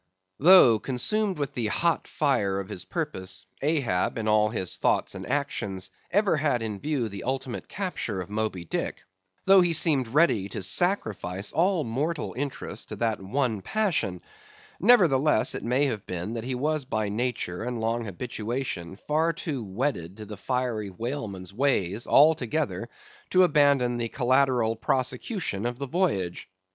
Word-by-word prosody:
Though, 145 Hz, -, +7 dB
consumed 190 Hz, -, 0 dB
with 145 Hz, -2 st, -3 dB
the 115 Hz, -3 st, -1 dB
hot 165 Hz, +10 st, 0 dB
fire 110 Hz, -10 st, 0 dB
of 95 Hz, -, -6 dB
his 90 Hz, -, -6 dB
purpose, 95 Hz, -, -4 dB, 0.2 s
Ahab 135 Hz, -, 0 dB
in 110 Hz, -1 st, -2 dB
all 105 Hz, 0 st, +4 dB
his 95 Hz, -6 st, -1 dB
thoughts -, -, +1 dB
and -, -, -7 dB
actions 100 Hz, -10 st, -2 dB, 0.2 s
ever 200 Hz, -2 st, +2 dB
had 145 Hz, -6 st, +1 dB
in 105 Hz, -3 st, -4 dB
view 145 Hz, -4 st, -1 dB
the 100 Hz, -2 st, -7 dB
ultimate 130 Hz, -1 st, -4 dB
capture 180 Hz, -, -3 dB
of 90 Hz, -, -5 dB
Moby 105 Hz, -4 st, -3 dB
Dick; -, -, -3 dB, 0.4 s
though 195 Hz, 0 st, +7 dB
he 175 Hz, -1 st, +2 dB
seemed 145 Hz, -6 st, +3 dB
ready 120 Hz, -, +2 dB
to 95 Hz, -, -4 dB
sacrifice 100 Hz, -, +1 dB
all 175 Hz, 0 st, +2 dB
mortal 145 Hz, +7 st, -2 dB
interests 140 Hz, +1 st, -4 dB
to -, -, -5 dB
that 115 Hz, -3 st, -1 dB
one 110 Hz, +1 st, -1 dB
passion; 175 Hz, -, -1 dB, 0.6 s
nevertheless 155 Hz, -, +4 dB
it -, -, -4 dB
may 125 Hz, +5 st, +2 dB
have 110 Hz, -7 st, -3 dB
been 90 Hz, +4 st, -4 dB
that 115 Hz, -1 st, -5 dB
he 130 Hz, 0 st, -2 dB
was 150 Hz, +3 st, 0 dB
by 110 Hz, -5 st, -2 dB
nature 110 Hz, -5 st, -2 dB
and 120 Hz, -1 st, -3 dB
long 115 Hz, +1 st, -1 dB
habituation 110 Hz, -2 st, -4 dB
far 155 Hz, +9 st, 0 dB
too 140 Hz, -9 st, -4 dB
wedded 100 Hz, -, -3 dB
to 105 Hz, -1 st, -8 dB
a -, -, -6 dB
fiery 120 Hz, -1 st, -2 dB
whaleman's 100 Hz, -4 st, -5 dB
ways, 110 Hz, -5 st, 0 dB
altogether 150 Hz, 0 st, +3 dB, 0.4 s
to 185 Hz, 0 st, +5 dB
abandon 140 Hz, -7 st, +3 dB
the 115 Hz, -1 st, -2 dB
collateral 125 Hz, -3 st, +2 dB
prosecution 125 Hz, -, -2 dB
of 120 Hz, 0 st, -4 dB
the 140 Hz, +1 st, -4 dB
voyage. 125 Hz, -, -1 dB
125 Hz, 155 wpm, -26 LUFS, 105-150 Hz, 0.6 s, Though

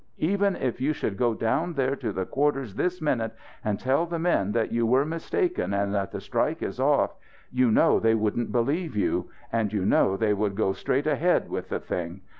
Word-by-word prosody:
Even 200 Hz, +3 st, +1 dB
if 125 Hz, -1 st, -3 dB
you 145 Hz, +4 st, +2 dB
should 110 Hz, -8 st, -3 dB
go 120 Hz, +2 st, +1 dB
down 115 Hz, +11 st, 0 dB
there 135 Hz, 0 st, +1 dB
to 120 Hz, -, -3 dB
the 95 Hz, -1 st, -2 dB
quarters 135 Hz, -5 st, 0 dB
this 180 Hz, -, -1 dB
minute 115 Hz, -7 st, 0 dB, 0.3 s
and 105 Hz, -2 st, -1 dB
tell 135 Hz, +7 st, +1 dB
the 170 Hz, 0 st, -3 dB
men 160 Hz, -, +1 dB
that 115 Hz, 0 st, 0 dB
you 115 Hz, 0 st, +1 dB
were 130 Hz, +5 st, +3 dB
mistaken 165 Hz, -, -1 dB
and 100 Hz, 0 st, 0 dB
that 100 Hz, -2 st, -1 dB
the -, -, -4 dB
strike -, -, -1 dB
is -, -, -4 dB
off -, -, +3 dB, 0.4 s
you 125 Hz, -1 st, +3 dB
know -, -, +4 dB
they 115 Hz, 0 st, +3 dB
wouldn't 110 Hz, +2 st, -1 dB
believe 140 Hz, +5 st, 0 dB
you. 100 Hz, -3 st, 0 dB, 0.2 s
And 110 Hz, -3 st, +1 dB
you 100 Hz, -3 st, -1 dB
know 95 Hz, -1 st, +3 dB
they 105 Hz, 0 st, +2 dB
would 100 Hz, -1 st, -1 dB
go 95 Hz, -2 st, +1 dB
straight 130 Hz, +8 st, -1 dB
ahead 155 Hz, +4 st, +1 dB
with -, -, -4 dB
the -, -, -2 dB
thing. 90 Hz, +2 st, -5 dB
120 Hz, 210 wpm, -26 LUFS, 105-150 Hz, 0.4 s, know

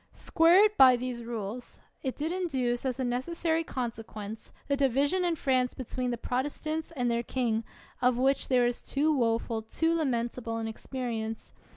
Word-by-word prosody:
Square 340 Hz, +4 st, +5 dB
it 425 Hz, 0 st, 0 dB
by 255 Hz, -1 st, +9 dB
these 245 Hz, -1 st, -4 dB
rules. 230 Hz, 0 st, -6 dB, 0.2 s
It 260 Hz, -2 st, -3 dB
did 310 Hz, +3 st, -2 dB
induce 265 Hz, -9 st, -1 dB
as 255 Hz, 0 st, -3 dB
a -, -, 0 dB
necessary 320 Hz, +7 st, 0 dB
consequence 225 Hz, -5 st, -6 dB, 0.2 s
the 280 Hz, -, +2 dB
division 280 Hz, +6 st, +2 dB
in 345 Hz, -2 st, +1 dB
France 255 Hz, -4 st, +1 dB
be 260 Hz, -, -5 dB
tween 250 Hz, +1 st, -3 dB
the 240 Hz, -, -2 dB
Protestants 295 Hz, +6 st, -2 dB
and 245 Hz, -3 st, 0 dB
their 235 Hz, 0 st, +1 dB
king, 230 Hz, -2 st, -1 dB, 0.4 s
of 250 Hz, -1 st, +3 dB
which 270 Hz, +2 st, +2 dB
there 250 Hz, -2 st, +4 dB
is 240 Hz, 0 st, -1 dB
too 300 Hz, +2 st, +1 dB
woful, 230 Hz, -2 st, 0 dB
too 325 Hz, +9 st, 0 dB
lamentable 240 Hz, -6 st, -1 dB
an 225 Hz, 0 st, -3 dB
experience. 225 Hz, -1 st, -5 dB
255 Hz, 170 wpm, -29 LUFS, 235-285 Hz, 0.4 s, by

